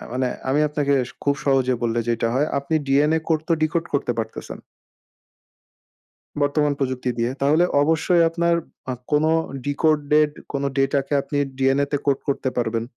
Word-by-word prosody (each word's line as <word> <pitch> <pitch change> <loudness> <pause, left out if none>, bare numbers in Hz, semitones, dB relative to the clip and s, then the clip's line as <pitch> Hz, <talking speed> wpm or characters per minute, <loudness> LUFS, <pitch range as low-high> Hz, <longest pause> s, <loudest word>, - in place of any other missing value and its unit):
আ - - -10
মানে 130 +1 0 0.2
আমি 140 +3 +2
আপনাকে 145 -1 0 0.3
খুব 140 - +2
সহজে 130 -2 +2
বললে 120 0 0
যেইটা 115 -1 +1
হয় 140 +4 +2
আপনি 140 +3 -3
DNA 150 +4 +3
কোড 160 -2 +2
তো - - +3
ডিকোড 160 +2 +1
করতে 140 -3 +1
পারতেছেন 110 0 -5 1.8
বর্তমান 145 0 +2
প্রযুক্তি 130 -2 -2
দিয়ে। 120 +1 0
তাহলে 150 +5 +4 0.2
অবশ্যই 160 +3 +3
আপনার 170 0 +1 0.4
অ - - -1 0.2
কোনো 155 +2 +3 0.3
ডিকোডেড 150 0 +2 0.2
কোনো 140 0 -1
ডেটাকে 135 +1 +1
আপনি 145 - -4 0.2
DNA 135 +1 +2
তে 145 - +1
কোড 140 -2 +2
করতে 140 -1 0
পারবেন। 115 -1 0
140 Hz, 155 wpm, -22 LUFS, 130-150 Hz, 1.8 s, তাহলে